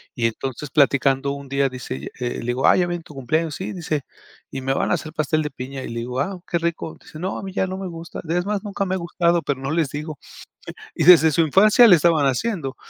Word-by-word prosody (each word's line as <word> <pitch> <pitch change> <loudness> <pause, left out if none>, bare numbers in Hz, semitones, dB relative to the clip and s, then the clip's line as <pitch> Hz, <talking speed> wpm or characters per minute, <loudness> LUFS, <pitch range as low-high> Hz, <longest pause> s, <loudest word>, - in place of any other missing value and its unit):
Y 120 - -1
entonces, 130 +4 -3
platicando 140 -1 +2
un 140 -1 -7
día, 140 0 +1
dice 125 - -6
ella 65 +2 -7
eh, 120 -1 -3
le - - -7
digo: 125 +2 +1
"Ah, - - +6
ya 175 -1 +2
viene 175 -1 -4
tu 150 - -14
cumpleaños". 155 +3 -1
"Sí", 190 - -5
dice. 160 -5 -2 0.5
"Y 135 - -5
me 135 +1 0
van - - 0
a - - +4
hacer 155 - -7
pastel 155 0 0
de 150 - -4
piña". 135 0 -7
Y - - -6
le 115 0 -4
digo: 125 +2 -4
"Ah, 185 +6 -2
qué 170 - +1
rico". 165 -1 -3
Dice: 155 - -12
"No, 185 +3 -3
a - - -7
mí 190 - -7
ya 190 -1 0
no 185 - -5
me 190 -1 -5
gusta. 165 -1 -8
Es 175 +2 0
más, 205 -1 -2
nunca 200 -1 -3
me 190 0 -1
ha - - -1
gustado, 170 -1 +1
pero 140 -2 -2
no 135 - -3
les 160 -3 +1
digo". 150 +1 -6 0.8
Y - - 0
desde 160 -2 +8
su 165 - +3
infancia 210 - +6
le 180 - +8
estaban 160 -2 +3
haciendo. 135 - -1
155 Hz, 260 wpm, -22 LUFS, 135-175 Hz, 0.8 s, desde